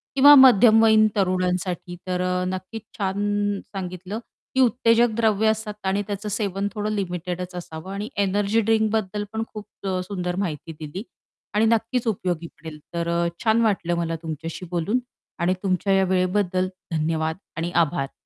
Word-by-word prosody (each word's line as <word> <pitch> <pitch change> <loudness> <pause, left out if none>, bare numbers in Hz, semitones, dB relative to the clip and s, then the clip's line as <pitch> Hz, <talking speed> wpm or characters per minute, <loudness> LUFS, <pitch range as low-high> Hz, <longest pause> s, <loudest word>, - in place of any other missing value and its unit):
किंवा 285 +2 +9
मध्यमवयीन 225 -4 +7
तरुणांसाठी 180 -2 -1
तर 180 -1 -1
अ, 180 0 0
नक्कीच 185 +4 -5 0.2
छान 205 0 0 0.2
सांगितलं 185 +2 -5 0.4
की 265 - +2
उत्तेजक 235 -1 +4
द्रव्य 220 -2 +2
असतात 220 -1 0
आणि 200 +2 +1
त्याचं 205 +1 -4
सेवन 200 -1 -1
थोडं 210 -1 -2
लिमिटेडच 180 -2 -3
असावं 175 +1 -7
आणि 205 +2 -4 0.2
एनर्जी 205 +3 +1
ड्रिंक 220 0 +2
बद्दल 210 -1 -1
पण 220 - -3
अ, - - +1
खूप 210 -2 -7 0.2
अ, 185 -1 0
सुंदर 180 -3 -3
माहिती 160 0 -6
दिली 160 +7 -6 0.5
आणि 215 +2 +3
नक्कीच 230 +2 +1
उपयोगी 180 -5 -1
पडेल. 160 -2 -11
तर 170 0 -2
अ, 170 0 +1 0.2
छान 225 0 +3
वाटलं 190 -6 +1
मला 165 -1 -1
तुमच्याशी 165 +3 -5
बोलून 180 +8 0 0.4
आणि 175 +2 +2
तुमच्या 195 +1 +1
या 195 0 +4
वेळेबद्दल 185 0 +1 0.2
धन्यवाद. 160 0 0 0.2
आणि 165 +1 -2
आभार. 145 -3 -4
190 Hz, 155 wpm, -24 LUFS, 175-215 Hz, 0.5 s, किंवा